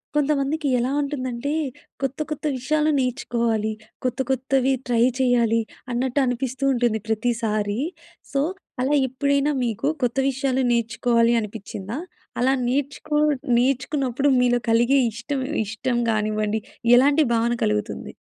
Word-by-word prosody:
కొంతమందికి 295 +1 +1
ఎలా 250 +2 0
ఉంటుందంటే, 275 -1 -3 0.5
కొత్త, 270 +2 -2
కొత్త 305 0 -5
విషయాలు 305 +4 +1
నేర్చుకోవాలి 235 -3 0 0.3
కొత్త, 255 0 -2
కొత్తవి 265 0 +1
ట్రై 235 -2 +2 0.2
చెయ్యాలి 235 -3 +3 0.3
అన్నట్టు 250 +3 0
అనిపిస్తూ 255 +1 -2
ఉంటుంది 240 -3 +1
ప్రతిసారి. 220 -1 -1 0.5
సో, 275 - +1 0.4
అలా 265 +3 +1
ఎప్పుడైనా 280 +3 +1
మీకు 230 +3 -2 0.2
కొత్త 245 +1 0
విషయాలు 265 0 0
నేర్చుకోవాలి 230 0 +2
అనిపించిందా? 210 +1 -6 0.4
అలా 260 +2 +3
నేర్చుకో 285 +3 -1 0.4
నేర్చుకున్నప్పుడు 270 +1 +1
మీలో 245 -1 +3
కలిగే 240 +4 +4
ఇష్టం 235 +5 -4 0.3
ఇష్టం 225 +4 -2
కానివ్వండి 215 0 0 0.4
ఎలాంటి 285 +5 +5
భావన 230 +1 +2
కలుగుతుంది? 105 0 -2
245 Hz, 110 wpm, -23 LUFS, 230-275 Hz, 0.5 s, ఎలాంటి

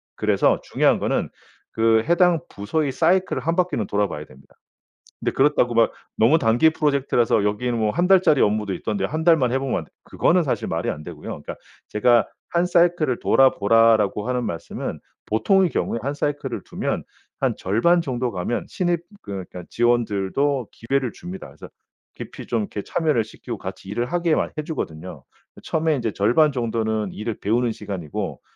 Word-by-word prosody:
그래서 - - +2
중요한 - - +2
거는 - - -1 0.4
그 115 0 +3
해당 175 0 +4
부서의 140 +9 -2
사이클을 180 +1 +1
1 165 +6 0
바퀴는 175 - 0
돌아 100 0 +1
봐야 75 -4 -7
됩니다. 70 -1 -20 0.6
근데 - - -1
그렇다고 135 -3 +2
막 115 0 +4 0.3
너무 120 +9 +5
단기 120 +7 +4
프로젝트라서 140 -8 +1
여기에는 115 +4 -1
뭐 110 -1 +1
1 175 +10 +1
달짜리 180 -6 +5
업무도 105 -2 +1
있던데 100 +1 -2
1 155 +8 -3
달만 160 -8 +4
해 130 - +1
보면 135 -1 -1
안되 - - -11
그거는 180 +1 +2
사실 140 - -2
말이 - - -2
안 75 - -5
되고요. 80 -2 -9
그러니까 - - -7 0.3
제가 120 +1 +3 0.2
"1 170 +1 +1
사이클을 170 -7 +2
돌아보라."라고 115 -4 +3
하는 125 -1 -1
말씀은 85 -7 -5 0.3
보통의 190 - +3
경우에 115 - -2
1 140 +4 -2
사이클을 145 0 -3
두면 - - -3 0.4
한 - - +1
절반 120 - +2
정도 125 -5 -2
가면 95 +5 -3
신입 175 -2 -1 0.2
그러니까 95 -2 -7
직원들도 120 +2 +1
기회를 130 +1 -1
줍니다. 180 +2 -8
그래서 - - -12 0.5
깊이 - - -9
좀 220 - 0
이렇게 205 - -5
참여를 150 -9 +1
시키고 115 +2 -8
같이 95 0 -8
일을 120 +4 -1
하게 170 -2 +1
막 - - -1
해주거든요. 85 - -5 0.4
처음에 160 -1 0
이제 115 -3 -2
절반 145 +10 +3
정도는 110 -4 -2
일을 110 +1 -4
배우는 115 +3 +1
시간이고 90 -9 -5
120 Hz, 375 characters per minute, -22 LUFS, 105-155 Hz, 0.6 s, 너무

